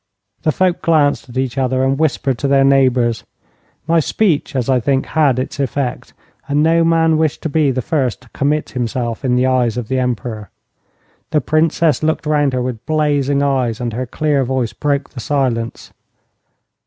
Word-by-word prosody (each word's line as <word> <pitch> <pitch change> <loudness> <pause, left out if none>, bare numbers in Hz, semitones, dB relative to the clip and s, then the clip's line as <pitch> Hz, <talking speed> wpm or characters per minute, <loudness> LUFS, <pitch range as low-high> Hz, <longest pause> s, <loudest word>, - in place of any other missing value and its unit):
The 155 - +1
folk 180 +1 0
glanced 145 -5 +2
at 120 - -8
each 130 0 -1
other, 130 0 0
and 135 +1 0
whispered 135 -4 0
to 140 - -1
their 135 0 +4
neighbours. 130 -4 +2 0.6
My 165 +1 +3
speech, 160 -3 0
as 125 -3 -1
I 130 -2 +3
think, 135 +3 0
had 145 -6 +2
its 130 +2 -4
effect, 135 -1 -3 0.3
and 145 +1 +1
no 165 +1 +3
man 165 -1 +3
wished 155 -3 -1
to 160 - -1
be 150 -1 +2
the 130 -1 -2
first 130 -6 -1
to 125 - -20
commit 150 +4 -1
himself 120 0 -3
in 125 -2 +1
the 125 +1 +2
eyes 125 -3 +1
of 120 -3 -4
the 130 0 0
Emperor. 115 -4 -3 0.8
The 155 - +2
Princess 155 0 +1
looked 155 0 -1
round 145 -2 +1
her 125 -1 -1
with 125 -3 -5
blazing 145 -2 +1
eyes, 130 -5 0
and 120 -2 -3
her 125 +2 -3
clear 145 +1 0
voice 125 -3 -2
broke 140 -1 -2
the 130 - -9
silence. 125 -4 -2
135 Hz, 180 wpm, -17 LUFS, 125-150 Hz, 0.8 s, their